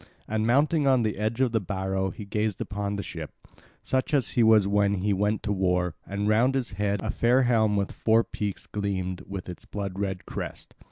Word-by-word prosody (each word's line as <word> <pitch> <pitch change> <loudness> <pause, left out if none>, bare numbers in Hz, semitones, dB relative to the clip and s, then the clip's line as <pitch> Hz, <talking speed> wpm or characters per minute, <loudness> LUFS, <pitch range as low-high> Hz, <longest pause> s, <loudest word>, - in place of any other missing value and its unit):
And 110 +1 0
mounting 145 +4 +3
on 130 -3 +4
the 110 -1 0
edge 110 +4 -1
of 130 -3 +3
the 110 - +2
barrow 95 -1 -2
he 100 +3 -8
gazed 105 0 -1
upon 100 -1 -3
the 100 - -3
ship, 80 -3 -6 0.5
such 130 +3 0
as 120 -10 +1
he 120 - +2
was 110 -3 +6
when 100 0 +2
he 100 +2 0
went 105 +2 0
to 105 - -1
war; 90 -2 +1
and 100 +1 -2
round 120 +5 +3
his 130 -3 -1
head 100 0 -1
a 110 - -1
fair 125 +3 +3
helm 110 -4 +3
with 100 -1 0
four 115 +1 +3
peaks 105 -4 -4
gleamed 95 -3 -3
with 100 -2 -6
its 90 - -8
blood 100 -2 -5
red 95 -2 -3
crest. - - -7
105 Hz, 210 wpm, -27 LUFS, 95-115 Hz, 0.5 s, was